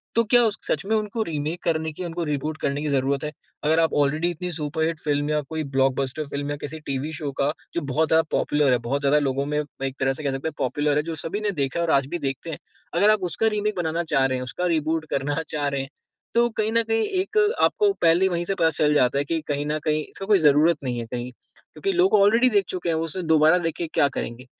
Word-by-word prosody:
तो 230 - +4
क्या 245 - +7
उस 215 -2 0
सच - - 0
में 220 +2 +1
उनको 215 +1 -2
रीमेक 155 -1 -3
करने 160 -1 0
की 180 - -6
उनको 170 0 -3
रीबूट 150 0 -2
करने 140 +1 -1
की 155 - -2
ज़रूरत 135 0 0
है। 150 - -3 0.3
अगर 155 +2 +3
आप 165 -1 +2
ऑलरेडी 155 +4 +1
इतनी 180 +2 -5
सुपर 160 0 -2
हिट 165 -1 -2
फ़िल्म 145 -1 -1
या 150 0 +1
कोई 160 -1 -2
ब्लॉकबस्टर 135 +2 +1
फ़िल्म 140 0 -4
या 145 - -1
किसी 155 +2 -6
टीवी 140 0 -4
शो 150 -3 -4
का 140 +1 +2 0.2
जो 170 - 0
बहुत 145 +3 0
ज़्यादा 160 +1 +4
पॉपुलर 145 -3 +2
है, 125 - +4
बहुत 120 +5 -2
ज़्यादा 145 +1 +3
लोगों 140 -1 -1
में 150 +1 -2 0.3
एक 135 0 -2
तरह 135 0 +1
से 155 - -6
कह 140 - 0
सकते 135 +3 -3
हैं 160 - -4
पॉपुलर 145 +3 0
है 150 - +1
जो 165 0 -4
सभी 165 +7 -3
ने 210 -1 0
देखा 135 +4 -1
है 170 - +1
और 165 - 0
आज 135 -1 +3
भी 175 - -3
देखते 135 +3 -4
हैं, 160 - -4 0.4
अगर 210 - +4
आप 215 - +2
उसका 225 - +1
रीमेक 210 0 -1
बनाना 170 0 -1
चाह 135 -4 +2
रहे 130 -1 0
हैं, 125 - -4
उसका 180 +8 -3
रिबूट 160 -1 0
करना 140 +2 -1
चाह 145 -2 -2
रहे 140 -1 -1
हैं 135 - -7 0.4
तो 235 +1 +4
कहीं 215 0 +1
न 230 - +4
कहीं 225 0 +2 0.2
एक 425 +3 -4 0.2
आपको 415 -1 +3
पहले 170 +3 +4
वहीं 175 -1 -2
से 195 - -1
पता 165 -4 +3
चल 150 -2 +1
जाता 130 -2 +3
है 140 - +2
कि 165 +2 -1
कहीं 145 0 -1
न 150 +1 -1
कहीं 155 -1 +2
इसका 195 - -7
कोई 205 -2 +4
ज़रूरत 150 +4 +5
नहीं 125 -2 -2
है 115 - -4
कहीं, 120 +2 -5
क्योंकि 390 - -7
लोग 370 +1 +4
ऑलरेडी 230 +5 +5
देख 205 -5 +2
चुके 175 -2 -3
हैं 160 - +1
वो 160 - -1
उसे 180 +3 -4
दोबारा 160 +1 +5
देख 165 -2 -1
के 170 - -2
क्या 140 - +4
करेंगे? 120 +3 -5
155 Hz, 265 wpm, -24 LUFS, 140-170 Hz, 0.4 s, क्या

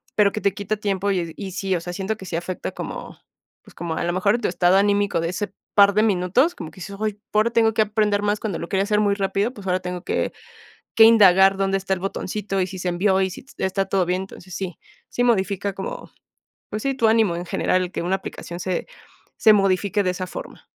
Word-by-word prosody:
pero 205 -2 +4
que 215 - -3
te 200 - +1
quita 205 +1 -3
tiempo 200 -1 -1
y 180 -3 0
d 165 - -9
y 195 -2 -6
sí, 190 0 -1
o 170 - -2
sea, 175 +1 -6
siento 195 +4 -2
que 190 - -10
sí 180 - -5
afecta 175 +2 -4
como, - - -7 0.5
pues, - - -18
como 165 -1 -4
a - - -2
lo 175 - -1
mejor 200 +5 +2
tu - - -1
estado 175 +1 +3
anímico 200 -2 +2
de 165 - -1
ese 195 +2 -4 0.2
par 200 -1 +6
de 215 - +3
minutos, 215 - +2
como 155 - -7
que - - -21
dices, 200 +3 -7
ay, 215 -1 0
p 205 - -30
ahora 215 +2 +3
tengo 225 -1 +3
que 220 - +2
aprender 210 -1 +1
más 205 0 +1
cuando 205 -6 -3
lo 170 - -6
quería 195 +1 +1
hacer 210 +1 +1
muy 205 -1 +2
rápido, 200 +3 0
pues, 205 -6 -11
ahora 180 0 +1
tengo 180 -1 -5
que - - -1 0.6
que 225 - +8
indagar 195 -4 +7
dónde 195 0 +1
está 195 0 -2
el 190 - -2
botoncito, 195 +1 -3
y - - +2
si 185 0 -8
se 180 - -1
envió 190 +2 +2
y 190 - +1
si 180 - -9
t 270 - -9
está 195 +1 0
todo 190 -1 +1
bien, 180 +1 0
entonces 185 -1 -11
sí 185 -4 -5 0.3
sí 245 - -1
modifica 200 -4 +1
como, 195 0 -6 0.6
pues, 215 - -4
sí, 275 0 +1
tu 230 -4 +2
ánimo 220 -5 +3
en 175 - -4
general, 185 +1 +1
el 180 - -4
que - - -3
una 180 +3 0
aplicación 175 -2 -8
se 180 0 -2 0.5
se 220 - +6
modifique 200 0 +2
de 185 - +1
esa 185 0 -4
forma. - - -9
195 Hz, 250 wpm, -22 LUFS, 185-210 Hz, 0.6 s, que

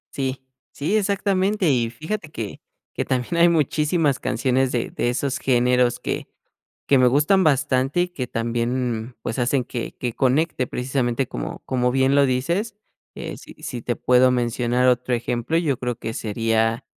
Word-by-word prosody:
Sí. 130 -1 -3 0.3
Sí, 155 +9 -1
exactamente. 200 -1 +1
Y 120 -3 +1
fíjate 160 - -5
que 110 -8 -6 0.4
que - - -1
también 130 +6 -1
hay 170 +1 +6
muchísimas 150 -2 +1
canciones 130 +2 +1
de 120 - -2
de 120 - -1
esos 135 +2 -1
géneros 125 -1 +2
que - - -3 0.6
que 140 - +4
me 125 - +5
gustan 150 +9 +4
bastante 135 +1 +2
y 180 - -1
que 130 -8 -5
también, 120 0 -2
pues, 115 - -4
hacen 125 +1 +1
que 120 0 -5
que 120 -2 -3
conecte 135 +1 +1
precisamente 125 0 -1
como - - -5
como 125 -1 +1
bien 135 +1 +2
lo 140 -1 +5
dices, 170 - -1 0.4
eh, - - -6
si - - -13
si 120 - -5
te 120 0 -2
puedo 125 0 +4
mencionar 120 0 +1
otro 125 0 +2
ejemplo, 120 +6 -1
yo 150 -7 +1
creo 125 -1 -2
que 110 - -5
sería 115 +2 0
130 Hz, 165 wpm, -22 LUFS, 120-145 Hz, 0.6 s, hay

